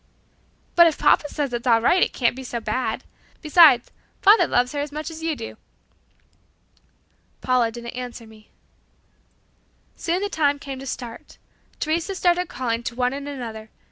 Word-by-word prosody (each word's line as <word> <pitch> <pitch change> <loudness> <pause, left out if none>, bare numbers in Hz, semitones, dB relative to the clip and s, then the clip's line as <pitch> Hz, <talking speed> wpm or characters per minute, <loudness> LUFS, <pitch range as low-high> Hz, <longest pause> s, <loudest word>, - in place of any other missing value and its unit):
"But 340 -1 +8
if 320 - 0
papa 295 - +3
says 285 -4 -3
it 240 - -2
is 255 - -7
all 230 -2 +5
right, 355 +11 +3
it - - +3
can't 240 -2 0
be 265 - -8
so 245 -2 -4
bad. 225 +3 -2 0.4
Besides, 300 -6 +6 0.3
father 415 +3 +6
loves 250 +1 +1
her 290 - -4
as 290 0 -3
much 305 +2 -5
as 325 0 -9
you 325 -1 -1
do." 230 -4 -8 1.8
Paula 250 -3 +2
didn't 235 +1 -8
answer 245 -2 -7
me. 220 -1 -18 1.5
Soon 350 +3 -2
the - - 0
time 290 -7 +1
came 275 -2 -7
to 270 - -8
start. 240 -3 -8 0.4
Teresa 330 +5 -1
started 355 -1 +1
calling 235 -7 -2
to 235 0 -5
one 250 +1 0
and 280 +1 -6
another. 225 -5 -7
265 Hz, 170 wpm, -23 LUFS, 235-315 Hz, 1.8 s, But